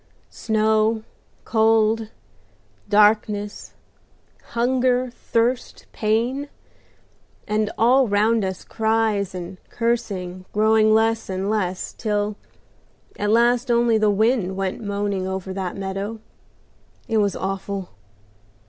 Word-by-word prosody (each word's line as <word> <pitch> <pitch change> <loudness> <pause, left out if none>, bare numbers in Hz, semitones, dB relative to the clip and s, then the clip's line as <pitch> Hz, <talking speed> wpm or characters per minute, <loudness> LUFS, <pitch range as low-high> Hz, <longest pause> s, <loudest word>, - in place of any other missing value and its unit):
Snow, 220 0 +1 0.4
cold, 220 0 +2 0.8
darkness, 210 0 +2 0.8
hunger, 250 +1 +1
thirst, 240 +1 -1
pain, 240 +7 -1 1.0
and 215 0 0
all 255 +3 +4
round 215 +2 +2
us 190 -1 -4
cries 220 -3 0
and 180 +1 -7
cursing 195 -6 -2
growing 215 +1 +4
less 225 0 +2
and 190 +2 -2
less, 185 -4 -2
till 210 -2 -1 0.8
at 205 - 0
last 240 +3 +3
only 235 -1 +3
the 215 -1 +3
wind 210 -2 +1
went 195 +1 -2
moaning 200 -2 -2
over 190 0 -4
that 185 -1 -4
meadow. 195 +3 -4 0.9
It 225 -2 0
was 205 -2 +1
awful! 195 0 -4
215 Hz, 100 wpm, -22 LUFS, 200-230 Hz, 1.0 s, all